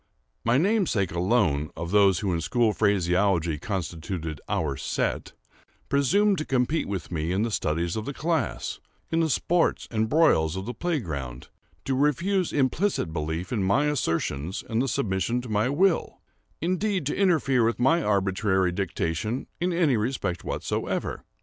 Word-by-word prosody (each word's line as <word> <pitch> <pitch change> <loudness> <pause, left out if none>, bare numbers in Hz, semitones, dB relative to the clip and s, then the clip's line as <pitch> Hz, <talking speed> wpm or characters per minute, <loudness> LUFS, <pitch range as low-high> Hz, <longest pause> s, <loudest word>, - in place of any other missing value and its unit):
My 115 +2 +3
namesake 175 - +1
alone, 85 -5 +1
of 85 +2 -4
those 100 -3 +4
who 95 -3 0
in 85 - -1
school 115 +4 +2
phraseology 90 -5 +1
constituted 85 -4 -4
"our 75 -4 0
set," - - -2 0.6
presumed 190 +9 +3
to - - -1
compete 130 +4 0
with 95 -3 -4
me 80 0 -2
in 95 +3 +1
the 115 - -1
studies 85 -2 -1
of 110 -1 -3
the - - -3
class—in 165 0 -3
the 165 -1 +2
sports 170 +4 +1
and 110 -1 0
broils 90 - +3
of 95 +1 -4
the 120 - -4
play 175 0 -1
ground—to 70 - -7
refuse 170 +7 +1
implicit 140 - 0
belief 80 +5 -3
in 110 - 0
my 100 +10 +2
assertions, 85 - -1
and 120 +4 0
submission 100 +3 0
to 125 - -9
my 105 +3 +1
will—indeed, 185 +2 -1
to 145 - -1
interfere 155 -10 +3
with 115 +1 +1
my 160 +8 +3
arbitrary 95 - +1
dictation 95 +5 -2
in 180 +1 0
any 165 -8 +2
respect 105 -6 -2
whatsoever. - - -3
110 Hz, 145 wpm, -26 LUFS, 90-150 Hz, 0.6 s, those